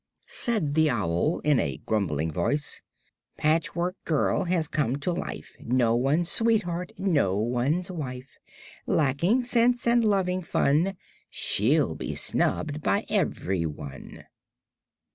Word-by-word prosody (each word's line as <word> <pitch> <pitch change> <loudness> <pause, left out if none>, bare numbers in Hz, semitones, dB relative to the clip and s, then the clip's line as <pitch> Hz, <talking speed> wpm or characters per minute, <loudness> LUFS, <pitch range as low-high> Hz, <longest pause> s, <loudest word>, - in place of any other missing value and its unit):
Said 215 - -1
the 155 0 +3
owl 105 - 0
in 145 -4 +3
a - - -2
grumbling 80 -8 0
voice: 145 - -1 0.6
"Patchwork 165 +3 0
Girl 160 +4 +1
has 170 -3 0
come 135 -5 0
to 145 +5 -2
life; 170 - -6
No 120 -1 +2
one's 140 +8 +1
sweetheart, 185 -6 +1
no 145 - +1
one's 125 - 0
wife; 130 -6 -7 0.5
Lacking 165 - +2
sense 245 0 +2
and 235 0 +4
loving 190 -3 +1
fun, 165 +3 +1 0.3
She'll - - +2
be - - -5
snubbed 155 0 -1
by 200 +7 +1
everyone." 85 - -3
155 Hz, 115 wpm, -26 LUFS, 125-185 Hz, 0.6 s, and